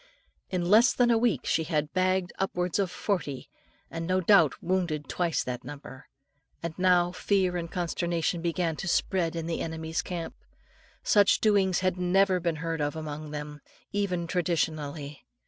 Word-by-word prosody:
In 180 -2 -1
less 220 +6 +6
than 240 -1 +3
a 230 - +4
week, 225 - +1
she 160 - +1
had 150 -2 -1
bagged 185 -1 +1
upwards 180 -1 -1
of 195 -2 +1
forty, 180 -7 -3 0.4
and 165 0 -4
no 185 0 +2
doubt 175 -5 +5
wounded 170 -5 -1
twice 170 -3 0
that 125 -1 -5
number. 140 -2 -10 0.6
And 170 -1 -3
now 180 -1 +4
fear 185 0 +1
and 170 -1 -4
consternation 175 -1 -1
began 170 -1 -1
to 190 - -5
spread 170 -1 0
in 165 -1 -3
the 165 0 -2
enemies' 160 0 -3
camp. 170 -2 -5 0.7
Such 205 -1 +4
doings 195 -4 +3
had 185 -1 0
never 185 +1 +3
been 170 -2 -1
heard 165 -2 -2
of 145 0 -1
among 155 -1 -6
them, 150 0 -7 0.3
even 185 -4 -1
traditionally. 155 -4 -2
175 Hz, 160 wpm, -28 LUFS, 160-185 Hz, 0.7 s, less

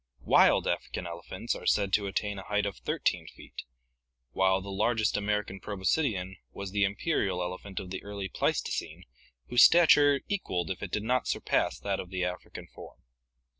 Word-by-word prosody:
Wild - - +5
African 90 - -3
elephants 85 +6 -5
are - - -7
said 100 -2 +2
to 100 -1 +2
attain 100 0 -2
a 95 - -10
height 105 0 0
of 100 - -4
13 - - -1
feet, - - -10 0.7
while 95 +4 +2
the 100 +1 -8
largest 110 +2 +1
American 105 -1 -1
proboscidean 95 -2 -1
was 100 -1 -7
the 100 0 +1
imperial 100 - 0
elephant 90 +2 -5
of 90 - -8
the 95 - -4
early 100 -1 -5
Pleistocene - - -2 0.5
whose 120 -1 +5
stature 145 -4 +6
equalled 95 - -2
if 95 - -5
it - - -4
did 105 - -2
not 125 +3 0
surpass - - 0
that 100 -1 -2
of 90 - -6
the 90 -1 -2
African 90 0 -6
form. - - -13
100 Hz, 170 wpm, -29 LUFS, 95-105 Hz, 0.7 s, stature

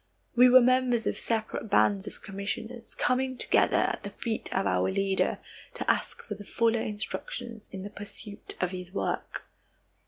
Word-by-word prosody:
We 250 +1 +8
were 255 +1 +9
members 250 -2 +3
of - - 0
separate 220 -1 -2
bands 200 0 +3
of - - -9
commissioners, 220 +4 -5
coming 260 0 +1
together - - +3
at - - +1
the 200 - -5
feet 220 +2 -3
of 190 - +1
our 90 +1 +2
Leader 195 - +1 0.4
to - - -4
ask - - -3
for 210 - -5
fuller 225 +2 +1
instructions 220 +1 -5
in 190 -1 -6
the 205 - -7
pursuit 205 0 -9
of 180 -1 0
his 180 -1 -7
work. 195 - -3
215 Hz, 160 wpm, -29 LUFS, 195-240 Hz, 0.4 s, were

